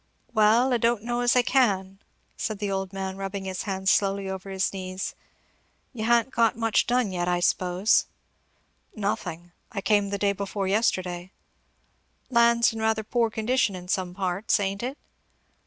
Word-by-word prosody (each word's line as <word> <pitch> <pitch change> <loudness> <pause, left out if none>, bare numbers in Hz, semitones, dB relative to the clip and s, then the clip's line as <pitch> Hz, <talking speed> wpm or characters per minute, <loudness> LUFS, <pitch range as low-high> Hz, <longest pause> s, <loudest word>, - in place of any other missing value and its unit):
"Well, 230 +4 +4
I - - +3
don't 230 -1 +1
know 240 +1 -2
as 245 0 +3
I 250 - +5
can," 195 -7 +1 0.4
said 215 -2 -3
the 205 -1 -3
old 195 -1 -2
man, 190 -1 -4
rubbing 195 0 -5
his 190 -1 -3
hands 190 0 +1
slowly 195 -1 +1
over 190 0 -6
his 190 0 -1
knees. 185 0 -5 0.8
"You 220 -3 -4
ha'n't 235 +2 +3
got 230 -2 +2
much 225 -1 +1
done 245 -4 +1
yet, 175 -1 -2
I 175 0 +1
s'pose?" 180 +3 +2 0.9
"Nothing. 175 -5 -3 0.2
I 200 - -3
came 205 0 +2
the 200 - -2
day 200 0 +2
before 200 0 -3
yesterday." 185 -3 0 1.0
"Land's 235 -1 +4
in 225 - -6
rather 220 0 +1
poor 230 +1 +1
condition 225 0 0
in 180 -1 -9
some 180 -1 -2
parts, 190 +3 0
ain't 195 0 -2
it?" 260 +4 -4
200 Hz, 165 wpm, -26 LUFS, 190-230 Hz, 1.0 s, I